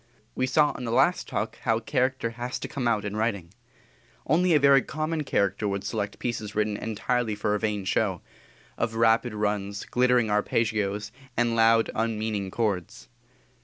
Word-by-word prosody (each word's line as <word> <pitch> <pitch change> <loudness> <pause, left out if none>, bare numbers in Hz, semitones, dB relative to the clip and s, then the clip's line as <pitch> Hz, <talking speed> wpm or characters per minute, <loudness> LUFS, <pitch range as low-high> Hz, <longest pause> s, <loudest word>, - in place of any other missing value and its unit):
We 130 - 0
saw 150 +3 +3
in 125 - -7
the 115 - -3
last - - +2
Talk - - -3
how 115 0 +1
character 130 0 -1
has 120 +2 -4
to - - -6
come 135 -4 -3
out 110 -3 +1
in 100 0 -4
writing. 100 -6 -2 0.7
Only 170 +3 +3
a - - +5
very 140 -1 +6
common 155 +3 -3
character 100 -5 0
would 100 -1 -2
select 105 0 -3
pieces 110 -3 -4
written 105 0 0
entirely 110 +1 -1
for 105 0 -1
a 105 - 0
vain 105 -3 -2
show - - 0 0.6
of 115 -1 -1
rapid 115 0 +3
runs, 105 -1 -2
glittering 125 -3 +2
arpeggios, 105 -1 0 0.3
and 120 -1 +2
loud, 115 0 +4
unmeaning 110 -3 -2
chords. 95 - -3
110 Hz, 165 wpm, -26 LUFS, 105-125 Hz, 0.7 s, very